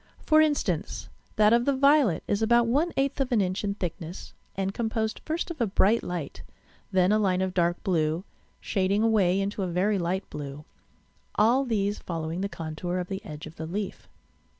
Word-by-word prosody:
For 310 0 +6
instance, 300 -2 -1 0.3
that 215 +1 +5
of 240 +1 +3
the 280 - +2
violet 275 - +4
is 205 - 0
about 235 +1 +4
one 290 +9 +1
eighth 275 +1 +1
of 265 -1 -1
an 235 - +3
inch 185 +1 -1
in 200 -1 -1
thickness, 175 -2 -6 0.2
and 195 0 -2
composed 220 -1 -2
first 330 +2 -2
of 310 - -6
a 230 - +3
bright 205 +3 +3
light, 170 -5 -5 0.5
then 185 0 +3
a 215 - +4
line 185 -3 +2
of 190 -1 -1
dark 175 -1 +1
blue, 165 -3 0 0.4
shading 195 +2 0
away 200 -5 +3
into 200 +1 -2
a 185 - 0
very 190 +4 +1
light 180 +3 -2
blue, 145 0 -7 0.7
all 245 +6 +4
these 205 -4 0
following 165 +1 -4
the 200 - -1
contour 165 +1 -4
of 180 -1 -3
the 190 0 -4
edge 150 0 -8
of 155 +1 -11
the 160 - -5
leaf. 195 +3 -5
195 Hz, 190 wpm, -27 LUFS, 175-225 Hz, 0.7 s, For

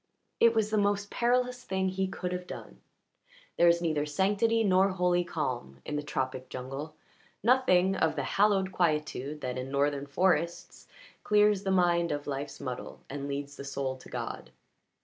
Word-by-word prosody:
It 230 0 +5
was 215 -1 +1
the 215 - +3
most 205 0 0
perilous 250 +1 +1
thing 190 -2 -1
he 190 +1 -1
could 185 -1 -4
have 180 0 -4
done. - - -9 0.8
There 175 - +5
is 170 0 +4
neither 155 -3 0
sanctity 205 +8 +2
nor 190 -1 +4
holy 180 -1 +2
calm 130 - -4
in 150 - -3
the 150 - -1
tropic 130 -3 -3
jungle, 135 +5 -6 0.5
nothing 195 -7 +4
of 160 -3 +1
the 140 - -1
hallowed 195 +3 +2
quietude 150 -4 -1
that, 125 0 -3
in 130 +1 -5
northern 140 0 0
forests, 170 +2 0 0.4
clears 210 -1 +4
the 195 - -3
mind 175 -2 +3
of 145 -1 -3
life's 140 0 -4
muddle 125 -1 -6
and 140 0 -4
leads 140 0 -5
the - - -7
soul 135 -1 -3
to - - -14
God. - - -5
170 Hz, 170 wpm, -29 LUFS, 140-195 Hz, 0.8 s, It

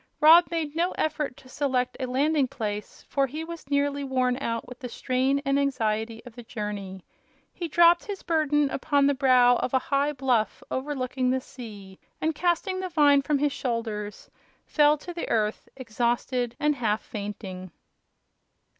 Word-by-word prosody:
Rob 330 +3 +7
made 320 -3 -3
no 345 +2 +1
effort 300 -4 -2
to 260 - -16
select 255 -2 -1
a 260 - -2
landing 280 +2 +2
place, 210 -6 -5
for 275 -1 +1
he 305 +5 -5
was 335 -3 -9
nearly 285 0 0
worn 255 -2 +1
out 230 -2 -3
with 250 +2 -12
a 250 - -4
strain 260 +4 0
and 275 0 +2
anxiety 225 -4 -1
of 245 - -11
the 240 - -10
journey. 210 -5 -6 0.5
He 345 - -4
dropped 345 +3 +5
his 405 -4 -6
burden 295 -4 +1
upon 285 0 +1
the 285 - +4
brow 255 -3 +5
of 255 - -1
a 260 +2 -1
high 285 +2 +2
bluff 255 -5 0
overlooking 260 -2 -2
the 260 +1 +1
sea 205 -7 -11 0.2
and, 320 +1 0
casting 360 +3 0
the 370 0 -3
vine 290 -4 +5
from 295 +1 0
his 285 0 0
shoulders, 220 -4 -4 0.3
fell 295 0 +4
to 350 +4 -8
the 340 - -5
earth 215 -2 -1
exhausted 240 0 -1
and 295 -1 +1
half 215 -3 0
fainting. 200 -3 -7
265 Hz, 165 wpm, -26 LUFS, 235-295 Hz, 0.5 s, Rob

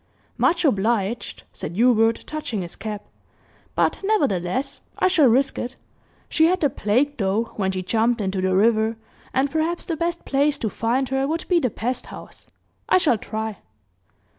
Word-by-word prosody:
"Much 340 0 +2
obliged," 225 -2 0
said 165 - -6
Hubert, 230 0 +3
touching 275 -10 -4
his 170 - -9
cap, 210 -2 -6 0.7
"but - - +1
nevertheless, 265 - 0 0.2
I - - +3
shall 330 -7 +5
risk 265 +4 +2
it. 250 +2 -4 0.5
She 320 0 +4
had 365 +2 +2
the 290 -4 +3
plague, 260 +9 +1
though, 210 +2 0
when 190 -2 0
she 185 -1 -3
jumped 230 +5 +1
into 190 -2 -1
the 185 0 +1
river, 220 +2 +3 0.3
and 270 +1 +1
perhaps 320 +2 -1
the 335 - -2
best 340 +1 -2
place 285 +1 +2
to 220 - -2
find 245 +3 0
her 270 0 0
would 325 +3 -3
be 355 -2 +4
the 255 - +1
pest 245 +3 -3
house. - - -12 0.4
I - - +6
shall 285 - +2
try." 220 -1 -4
240 Hz, 165 wpm, -23 LUFS, 215-290 Hz, 0.7 s, I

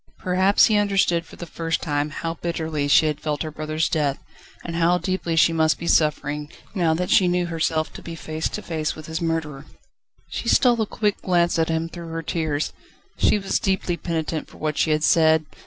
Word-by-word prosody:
Perhaps 185 +2 +3
he 215 - +3
understood 195 -5 +1
for - - -13
the 175 - -7
first 165 0 -2
time 145 -1 -1
how 165 +2 -4
bitterly 160 -3 -3
she 145 - +5
had 150 -2 -1
felt 150 0 -2
her 155 - -5
brother's 155 +1 -1
death, 145 -4 0 0.5
and 170 - -4
how 170 +1 +3
deeply 180 -1 -2
she 165 +1 +4
must 160 -1 +2
be 170 - -7
suffering, 150 -2 +1 0.2
now 170 -5 +2
that 180 +2 -2
she 185 - +5
knew 180 0 +1
herself 160 -1 -1
to - - -9
be 165 - -7
face 160 0 -3
to - - -6
face 155 -2 -2
with 155 - -10
his 160 +2 -4
murderer. 155 -4 -3 0.6
She - - -4
stole 240 -3 +4
a 215 - 0
quick 210 -1 -1
glance 175 -2 +2
at 160 - +1
him, 165 0 0
through 170 0 -9
her 165 0 -5
tears. 155 -2 -2 0.5
She - - +4
was 195 -1 -1
deeply 190 -4 0
penitent 160 -2 -3
for - - -16
what 155 -1 -2
she 160 - +1
had 155 0 +1
said. 160 -1 +4
165 Hz, 205 wpm, -23 LUFS, 155-175 Hz, 0.6 s, she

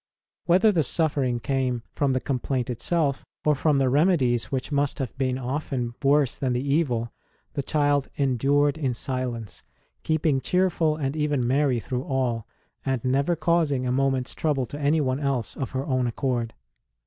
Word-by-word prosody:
Whether 190 +5 +5
the 175 -5 +2
suffering 140 -5 0
came 130 -2 -1
from 140 -2 +1
the 130 - +1
complaint 130 -1 -2
itself, 140 +3 0 0.2
or 150 - +5
from 150 +1 +2
the 135 -1 +2
remedies 135 -4 +3
which 135 +2 -4
must 145 -1 +1
have 130 -4 -4
been 130 -1 0
often 130 -2 -3
worse 140 -1 +2
than 130 -2 0
the 125 +3 -2
evil, 120 -8 0 0.4
the - - -1
child 145 -1 +1
endured 140 +2 +2
in 130 -5 0
silence, 125 -6 -4 0.4
keeping 155 -3 +1
cheerful 170 0 +1
and 140 -1 -2
even 150 -4 0
merry 135 -1 +2
through 125 +3 -4
all, 120 -4 -1 0.4
and 130 -3 -2
never 140 +6 +2
causing 155 -5 +1
a 125 - 0
moment 135 -1 +1
s - - -7
trouble 145 -5 0
to 145 - -8
anyone 145 -2 +1
else 135 -5 -1
of 135 - -3
her 130 +1 -3
own 130 -4 +1
accord. 120 -2 -2
135 Hz, 165 wpm, -25 LUFS, 125-150 Hz, 0.4 s, Whether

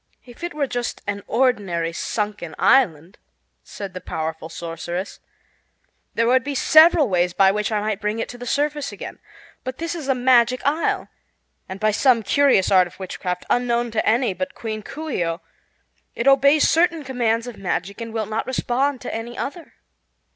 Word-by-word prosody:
"If 245 +6 -14
it 345 -3 -4
were 295 -2 0
just 245 -2 -4
an 200 0 -3
ordinary 200 -10 0
sunken 205 -4 -3
island," 180 - +2 0.4
said 200 -2 -8
the 185 - -7
powerful 160 -1 -5
sorceress, 170 +3 -5 1.0
"there 230 - +2
would 255 +2 +3
be 285 +1 -4
several 315 +1 +6
ways 180 -3 +1
by 190 +1 +5
which 210 +2 -2
I 210 -1 0
might 215 0 -2
bring 210 +2 -1
it 230 - -2
to 245 - -9
the 245 - -7
surface 295 +2 -1
again. - - -8 0.4
But 255 0 -5
this 335 +1 -3
is 320 -5 -6
a 270 - +2
Magic 250 0 +3
Isle, 305 +4 0 0.6
and 190 +1 -6
by 215 +1 +2
some 235 +1 +3
curious 265 -4 +3
art 185 -2 +5
of 175 - -17
witchcraft, 180 -1 -4
unknown 240 -1 0
to 215 - 0
any 230 -2 +2
but 275 +8 -5
Queen 220 -1 -5
Coo 310 +8 -7
ce - - -1
oh, 165 0 -2 0.7
it 235 - -2
obeys 280 +2 +5
certain 330 -1 +2
commands 235 -3 0
of 245 -3 -8
magic 195 +2 -3
and 230 0 -5
will 220 -1 -2
not 215 +2 -3
respond 260 +1 0
to - - -5
any 230 +2 -6
other. 330 +4 -6
230 Hz, 180 wpm, -22 LUFS, 195-265 Hz, 1.0 s, several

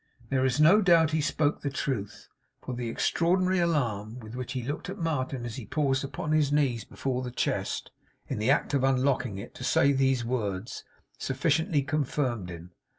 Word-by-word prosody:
There 130 -1 +1
is 130 +2 +1
no 170 +8 +7
doubt 170 -4 +5
he 155 0 +1
spoke 145 +1 0
the 145 - -1
truth, 130 -7 -4 0.4
for 130 - -5
the 120 -1 -3
extraordinary 180 +8 +2
alarm 120 -10 0
with 110 -1 -10
which 125 0 -5
he 125 -2 -3
looked 145 +7 -4
at 195 - -5
Martin 135 - -2
as 115 -2 -5
he 120 -6 -7
paused 140 -1 +1
upon 150 +3 -4
his 150 -2 +3
knees 135 -6 +1
before 130 -2 -3
the 125 - -4
chest, 120 - -2 0.4
in - - -3
the 110 +4 +1
act 135 - +2
of 135 -2 +2
unlocking 130 -4 +1
it, 100 - -8
to - - -9
say 140 - +4
these 135 -3 +2
words, 115 -2 -3 0.4
sufficiently 145 +2 +1
confirmed 130 - -1
him. 85 +1 -9
135 Hz, 185 wpm, -28 LUFS, 120-150 Hz, 0.4 s, no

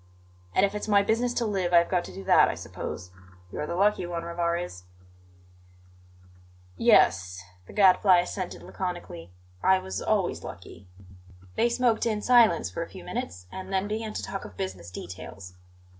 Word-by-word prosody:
"And 190 - +5
if 200 - -3
it's 210 - -4
my 200 -1 +4
business 230 +4 +1
to 235 - 0
live, 190 -4 -1
I - - +8
have 170 - +4
got 180 -2 +1
to - - -9
do 95 - -8
that, - - +5
I - - -2
suppose. 90 0 -7 0.4
You're 150 - -4
the - - -3
lucky 200 -1 +2
one, 170 -1 -4
Rivarez." 170 - -3 1.9
"Yes," 90 0 +3 0.2
the - - -12
Gadfly 190 -1 +6
assented 180 +1 -3
laconically; 175 - -6 0.3
"I 190 - +5
was 95 - -5
always - - 0
lucky." 95 - -10 0.7
They 235 - +2
smoked 235 -1 +1
in 210 -2 -1
silence 225 - +4
for - - -4
a - - -5
few - - -11
minutes, 90 +2 -5
and 190 0 -7
then 190 +1 0
began 215 +1 -3
to - - -4
talk 195 - -5
of 90 - -11
business 95 -2 -5
details. 90 +1 -9
180 Hz, 170 wpm, -27 LUFS, -, 1.9 s, I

